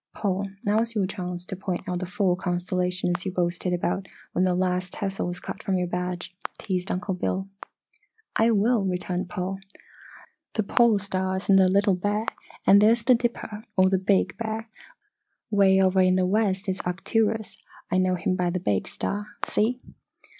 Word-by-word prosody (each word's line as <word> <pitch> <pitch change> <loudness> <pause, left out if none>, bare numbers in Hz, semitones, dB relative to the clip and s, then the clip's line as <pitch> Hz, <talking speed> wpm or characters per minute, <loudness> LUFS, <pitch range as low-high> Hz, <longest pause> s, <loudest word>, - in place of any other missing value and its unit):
"Paul, 195 -1 -1 0.2
now's 225 +3 +1
your 200 -3 +2
chance 180 -2 -5
to 190 - -5
point 185 0 -4
out 180 -1 -1
the 185 - -4
four 190 -1 +1
constellations 180 0 -1
you 190 - -2
boasted 175 0 -1
about 185 +2 -1 0.2
when 180 - +1
that 180 -1 +2
last 180 0 0
tassel 195 -2 -2
was 175 0 -4
cut 200 - -7
from 195 -4 0
your 180 - 0
badge," 180 0 -4 0.2
teased 185 -2 -3
Uncle 185 +1 -2
Bill. 190 +1 -2 0.9
"I 225 +1 +4
will," 225 0 +3
returned 180 -1 -2
Paul. 185 +2 -3 0.9
"The 220 - 0
Pole 235 0 +4
Star's 190 -1 -2
in 195 - +7
the 190 -1 +5
Little 200 +1 +3
Bear, 205 +4 -1 0.4
and 200 +1 +7
there's 230 +2 +4
the 255 - +6
Dipper, 230 -3 -2
or 185 0 +5
Big 190 +1 +2
Bear. 225 0 -4 0.8
Way 195 -2 +5
over 190 0 +4
in 185 0 +4
the 185 0 +2
west 200 0 +1
is 190 +1 -1
Arcturus 215 +4 -1 0.3
I 185 - +3
know 185 0 +2
him 185 +1 0
by 180 -1 0
the 180 +1 -1
big 100 - 0
star, 205 +1 -3 0.2
see? 230 +4 +1
190 Hz, 170 wpm, -26 LUFS, 180-205 Hz, 0.9 s, in